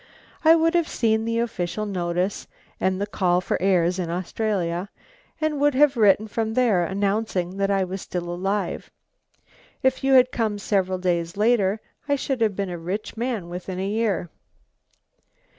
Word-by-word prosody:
I 325 +1 +7
would 330 +1 +2
have 340 -2 +2
seen 220 -1 +1
the 230 0 -1
official 215 -3 -2
notice 180 0 -2 0.3
and 185 0 0
the 200 - 0
call 180 -3 +1
for 180 - -2
heirs 180 -1 +2
in 175 -2 -2
Australia, 180 0 -2 0.5
and 310 -2 -1
would 290 -2 +3
have 285 0 +5
written 215 -1 +4
from 220 +1 -2
there, 225 -8 +3
announcing 195 -1 -1
that 200 0 +1
I 195 -1 +2
was 185 +1 -5
still 175 -1 -4
alive. 195 +2 -2 0.9
If 260 0 +1
you 270 0 +3
had 255 -1 +6
come 220 -3 -1
several 190 -2 0
days 175 -1 -1
later 215 -2 +2 0.3
I 285 - +4
should 270 -2 -2
have 215 -3 +2
been 195 -2 -2
a 175 - -5
rich 185 +6 -4
man 230 -6 -2
within 180 +1 -6
a 190 - -1
year." 205 -5 -1
200 Hz, 165 wpm, -24 LUFS, 180-230 Hz, 0.9 s, I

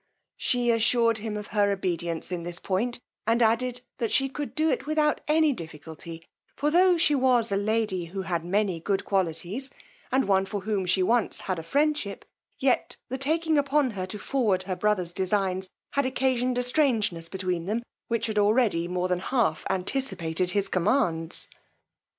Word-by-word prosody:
She 245 -1 +1
assured 230 0 +3
him 215 0 -4
of 210 - -5
her 205 -1 +3
obedience 175 -4 -2
in 175 -1 -2
this 175 0 -5
point, 225 +7 -1 0.3
and 230 +1 +3
added, 245 +2 +1 0.2
that 230 - -1
she 270 -1 +2
could 290 +1 -5
do 315 +1 +2
it - - -2
without 305 -1 +1
any 310 -1 +4
difficulty; 165 - -9 0.3
for 295 +2 0
tho' 360 +1 +5
she 330 -2 +3
was 255 -5 +3
a - - +2
lady 205 -3 0
who 190 +3 -5
had 170 -3 -2
many 190 -1 0
good 195 +3 -1
qualities, 190 - -1 0.4
and 265 -2 +2
one 195 -1 +3
for 200 +1 -4
whom 200 -2 -1
she 185 +1 +3
once 230 +4 +1
had 185 -3 -2
a - - -4
friendship, 285 - 0 0.3
yet 260 -2 +1
the 260 - -2
taking 315 +2 +2
upon 280 -2 +2
her 185 -3 -4
to 210 - -5
forward 210 -6 0
her 185 -1 -3
brother's 185 -3 0
designs 190 0 -1 0.2
had 280 -2 +1
occasioned 255 -1 0
a 250 - +2
strangeness 225 - +1
between 180 -3 -2
them, 220 +5 -1 0.2
which 230 -1 0
had 215 -2 0
already 205 -5 +3
more 180 0 -1
than 180 -1 0
half 225 -5 0
anticipated 185 -4 -1
his 200 +1 +1
commands. 180 -4 +1
210 Hz, 175 wpm, -27 LUFS, 185-255 Hz, 0.4 s, tho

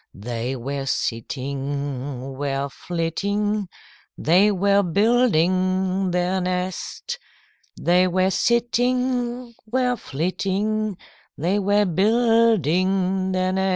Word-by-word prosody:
They 120 +4 -4
were 135 +2 -4
sitting, 135 +2 -3
were 140 0 -2
flitting, 200 +6 -2 0.5
They 185 +6 +4
were 200 +1 +3
building 185 -2 +2
their 180 +1 0
nest. 185 - -3 0.6
They 180 +2 +3
were 185 +1 +1
sitting, 245 +2 0
were 250 +2 +1
flitting, 195 - -2 0.4
They 180 +7 +1
were 205 +1 +2
building 190 - +2
their 185 0 0
nest." 190 0 +1
185 Hz, 85 wpm, -23 LUFS, 160-210 Hz, 0.6 s, They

